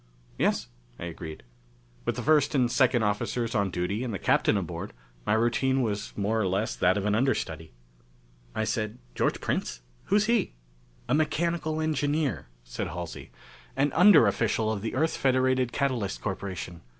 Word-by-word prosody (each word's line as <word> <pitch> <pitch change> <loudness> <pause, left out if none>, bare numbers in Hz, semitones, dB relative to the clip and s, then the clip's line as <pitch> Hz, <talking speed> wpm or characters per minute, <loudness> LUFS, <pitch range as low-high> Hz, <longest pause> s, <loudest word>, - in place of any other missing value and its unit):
"Yes," - - +1 0.3
I - - -6
agreed. 80 -2 -7 0.6
With - - 0
the - - -4
first 150 -1 +3
and 125 -3 +3
second 125 -3 +3
officers 115 +3 -1
on 100 -4 +1
duty, 95 +6 -2
and 125 - -3
the 100 - -2
Captain - - +2
aboard, - - -5 0.3
my - - +3
routine 125 +4 +2
was 105 -3 -2
more 110 +2 +1
or 100 - +1
less 95 +4 -1
that 95 - +3
of 100 - -2
an 105 - +2
understudy. 85 - -1 0.8
I 110 - 0
said, 110 -1 -2 0.2
"George - - 0
Prince? - - -2 0.2
Who 200 - +1
is 210 0 +4
he?" 230 -2 +1 0.5
"A 125 - +1
mechanical 155 +1 0
engineer," 150 - 0 0.2
said - - -4
Halsey. - - -7 0.5
"An 145 +1 +2
underofficial 115 - +4
of 100 - -4
the 110 - -3
Earth 160 +5 +1
Federated 130 -1 +2
Catalyst 120 -7 -1
Corporation. 95 -3 -5
115 Hz, 160 wpm, -27 LUFS, 100-140 Hz, 0.8 s, is